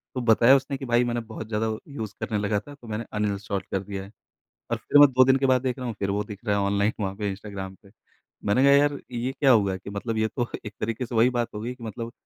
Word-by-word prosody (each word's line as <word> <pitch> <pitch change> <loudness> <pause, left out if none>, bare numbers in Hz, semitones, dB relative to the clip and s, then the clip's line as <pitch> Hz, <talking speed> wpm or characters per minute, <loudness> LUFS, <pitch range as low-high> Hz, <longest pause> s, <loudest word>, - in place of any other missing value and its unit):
तो 125 - -1
बताया 120 +2 +6
उसने 135 +1 -1
कि 135 - -7
भाई 120 0 +3
मैंने 120 -1 -1
बहुत 110 0 -6
ज़्यादा 110 0 -1 0.2
यूज़ 110 -8 -6
करने 110 - -2
लगा 105 0 0
था, 145 +7 -12
तो 125 -5 -15
मैंने 110 +1 -4
अनइंस्टॉल 100 -1 -2
कर 95 - 0
दिया 100 -1 -6
है। 100 - -12 0.6
और - - +1
फिर 145 - +3
मैं 145 - +10
2 130 +1 +7
दिन 130 +1 +5
के 135 - 0
बाद 130 -2 +3
देख 130 0 -1
रहा 125 - -4
हूँ 115 - -4
फिर 100 - -1
वो 100 +1 0
दिख 105 -2 -9
रहा 105 -2 +2
है - - +1
ऑनलाइन 100 +2 +1
वहाँ 95 -2 -2
पे 105 0 -2
इंस्टाग्राम 95 -1 -7
पे। 100 - -17 0.6
मैंने 105 +6 +3
कहा 140 - +6
यार 145 0 +4
ये 120 +1 -2
क्या 140 -3 +5
हुआ 100 -5 +3
कि 95 - -10
मतलब 110 +3 -3
ये 110 0 +2
तो 120 -2 0 0.2
एक 105 - -6
तरीके 115 +3 -2
से 120 - -6
वही 115 +2 +5
बात 120 -2 -2
हो 105 - -4
गई 120 +3 -4
कि 125 - -13
मतलब 115 +1 -6
110 Hz, 280 wpm, -25 LUFS, 100-125 Hz, 0.6 s, मैं